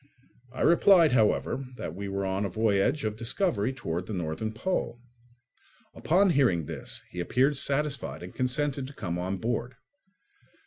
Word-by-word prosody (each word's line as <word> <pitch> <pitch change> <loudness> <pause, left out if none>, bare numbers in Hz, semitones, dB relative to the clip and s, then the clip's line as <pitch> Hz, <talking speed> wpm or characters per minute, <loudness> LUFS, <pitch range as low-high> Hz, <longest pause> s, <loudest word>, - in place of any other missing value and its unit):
I 130 - -7
replied, 170 -1 +6
however, 125 +3 +2
that 80 - -5
we 100 +2 -5
were 100 0 -2
on 95 +1 -1
a 100 - -1
voyage 110 - +1
of 105 -1 -2
discovery 115 - 0
towards 90 -9 -4
the 110 - -5
northern 90 +4 -3
pole. 120 -1 -2 0.9
Upon 185 +3 +3
hearing 120 - +2
this - - -4
he 90 - -7
appeared 130 +11 +2
satisfied 140 -5 -1
and 90 - -9
consented 130 +1 -1
to 140 - -11
come 90 -9 -4
on 95 +2 -2
board. 120 +4 -3
115 Hz, 150 wpm, -28 LUFS, 95-140 Hz, 0.9 s, replied